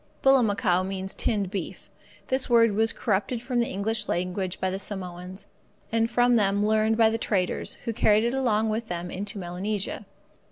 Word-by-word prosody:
Bullamacow 205 Hz, -9 st, +3 dB
means 190 Hz, 0 st, -4 dB
tinned 200 Hz, -4 st, -1 dB
beef. 195 Hz, -5 st, -5 dB, 0.4 s
This 260 Hz, 0 st, 0 dB
word 230 Hz, -2 st, +5 dB
was 220 Hz, +2 st, +2 dB
corrupted 210 Hz, +3 st, -1 dB
from 245 Hz, +1 st, -2 dB
the 235 Hz, -, +1 dB
English 215 Hz, +2 st, -2 dB
language 180 Hz, +1 st, -2 dB
by 185 Hz, -, 0 dB
the 190 Hz, -, -3 dB
Samoans, 185 Hz, -1 st, -6 dB, 0.5 s
and 230 Hz, 0 st, +1 dB
from 245 Hz, 0 st, +3 dB
them 200 Hz, -1 st, +2 dB
learned 220 Hz, +1 st, +2 dB
by 225 Hz, -1 st, +5 dB
the 225 Hz, -, -2 dB
traders, 190 Hz, -5 st, -1 dB
who 230 Hz, -, -1 dB
carried 215 Hz, -1 st, +3 dB
it 235 Hz, +1 st, 0 dB
along 225 Hz, -5 st, +1 dB
with 225 Hz, +1 st, -3 dB
them 175 Hz, -1 st, -4 dB
into 200 Hz, +2 st, -5 dB
Melanesia. 195 Hz, +3 st, -3 dB
210 Hz, 170 wpm, -26 LUFS, 190-230 Hz, 0.5 s, word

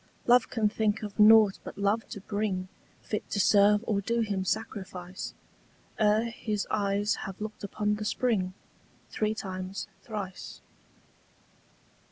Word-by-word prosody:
Love 245 Hz, 0 st, +5 dB
can 225 Hz, -3 st, +1 dB
think 215 Hz, 0 st, 0 dB
of 210 Hz, 0 st, -7 dB
nought 215 Hz, -2 st, +7 dB
but -, -, -9 dB
love 200 Hz, +3 st, 0 dB
to -, -, -6 dB
bring 200 Hz, -2 st, -2 dB, 0.4 s
Fit 210 Hz, -, -4 dB
to 200 Hz, -, -1 dB
serve 205 Hz, +1 st, +5 dB
or 200 Hz, -2 st, 0 dB
do 235 Hz, +3 st, 0 dB
him 200 Hz, -4 st, -1 dB
sacrifice 185 Hz, -3 st, -4 dB, 0.6 s
Ere 215 Hz, +2 st, +3 dB
his 215 Hz, -3 st, -3 dB
eyes 205 Hz, 0 st, +1 dB, 0.2 s
have 190 Hz, -, -9 dB
looked 215 Hz, 0 st, -6 dB
upon 210 Hz, +1 st, -1 dB
the 215 Hz, -, -4 dB
spring 210 Hz, -5 st, 0 dB, 0.6 s
Three 215 Hz, 0 st, 0 dB
times 190 Hz, -1 st, -5 dB
thrice. 200 Hz, -5 st, -7 dB
210 Hz, 135 wpm, -29 LUFS, 195-220 Hz, 0.6 s, nought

